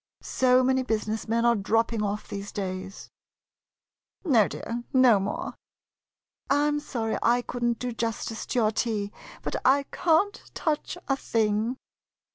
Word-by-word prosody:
So 255 0 +3
many 260 +1 +2
business 220 -2 -2
men 230 +1 +1
are 235 0 +5
dropping 225 +2 +1
off 210 0 -2
these 200 0 -6
days. 190 0 -5 1.1
No, 235 - +5
dear; 235 +1 -5
no 255 -6 +6
more. 195 +2 -3 1.0
I 290 +1 +3
'm 295 0 +1
sorry 235 -7 -2
I 245 +1 +3
could 245 0 -5
n't 240 -1 +2
do 250 +1 -3
justice 225 -1 -3
to - - -2
your 215 -3 +3
tea, 210 -3 -1 0.3
but - - -2
I 275 +2 +4
can't 355 +4 +2
touch 315 +1 -1
a 270 - +2
thing. 225 -1 0
230 Hz, 145 wpm, -27 LUFS, 215-260 Hz, 1.1 s, no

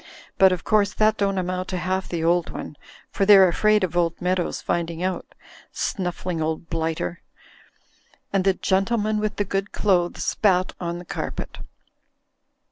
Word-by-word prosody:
But 190 -1 +7
of 180 -2 -2
course 205 -1 +2
that 215 0 +3
don't 195 -1 0
amount 185 0 -2
to 185 - -3
half 185 +1 -2
the 170 -2 -2
old 170 0 +2
one, - - -7 0.4
for - - 0
they're 195 -1 +8
afraid 210 +4 +2
of 175 -2 -2
old 170 -1 +1
Meadows 180 -1 -1
finding 170 0 -2
out. 185 0 -3 0.4
Snuffling 180 -3 -3
old 160 +1 -3
blighter!" 160 - -2 1.1
And 195 -1 +2
the 195 -1 +3
gentleman 210 +3 0
with 210 0 -2
the 205 - -1
good 195 +1 -2
clothes 180 -4 +1
spat 185 -3 +2
on 170 -1 -3
the 175 - -9
carpet. - - -5
185 Hz, 155 wpm, -23 LUFS, 175-195 Hz, 1.1 s, they're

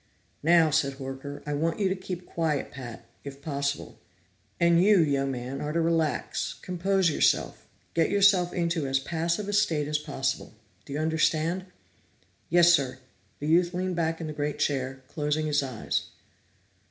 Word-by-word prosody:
"Now," 165 0 +5
said 140 -1 +2
Horker, 135 +1 -7
"I 150 - -2
want 160 +5 -1
you 200 - +2
to 190 - 0
keep 185 -1 -6
quiet, 160 -4 -1
Pat 120 -4 -9 0.2
if 140 -1 -8
possible. 140 -1 -3 0.6
And 170 0 +5
you, 205 -1 +6
young 140 -4 +2
man, 130 +1 -4
are 150 - -2
to 165 - 0
relax, 165 -4 0
compose 185 0 +1
yourself, - - +1 0.3
get 165 -1 +2
yourself 195 -3 +4
into 170 -4 -1
as 135 0 +2
passive 170 +7 -2
a 205 - -3
state 165 -8 +2
as 150 0 0
possible. 135 -5 -3 0.3
Do 140 - -8
you - - -2
understand?" 160 +3 +1 0.8
"Yes, 175 +1 +6
sir," 130 -5 +1 0.4
The 145 - -6
youth 175 +2 +3
leaned 185 0 -1
back 165 -1 -1
in 165 - -4
the 155 - -5
great 150 0 -2
chair, 135 -1 -1
closing 150 0 -1
his 150 -1 +2
eyes. 130 -5 -2
155 Hz, 165 wpm, -27 LUFS, 140-175 Hz, 0.8 s, you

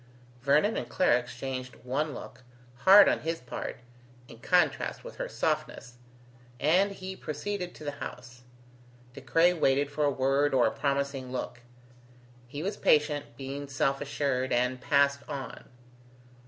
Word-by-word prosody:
Vernon 150 - +3
and - - -4
Clara 125 -10 +3
exchanged 125 +1 -6
one 140 +4 -2
look, - - -10 0.4
hard 200 +2 +9
on - - +2
his 165 +1 -3
part, 125 0 -6 0.5
in 115 - -13
contrast 180 +8 +1
with - - -10
her - - -4
softness, 125 - -3 0.6
and 185 +7 +3
he 190 0 -7
proceeded 180 +2 -5
to - - -11
the 145 - -3
house. 125 0 -8 0.7
De 140 - -10
Craye 165 +8 +3
waited 140 -3 +1
for 150 +1 -1
a 145 - +4
word 135 +1 +1
or 125 - +4
a 110 - +2
promising 140 -2 -2
look. 125 -1 -5 0.9
He 145 +5 -6
was 200 +2 -3
patient, 150 -4 +1
being 140 +1 -6
self 135 0 0
assured, 135 -2 -1
and 125 +1 +1
passed 140 0 +2
on. 135 -4 -7
140 Hz, 145 wpm, -29 LUFS, 130-155 Hz, 0.9 s, hard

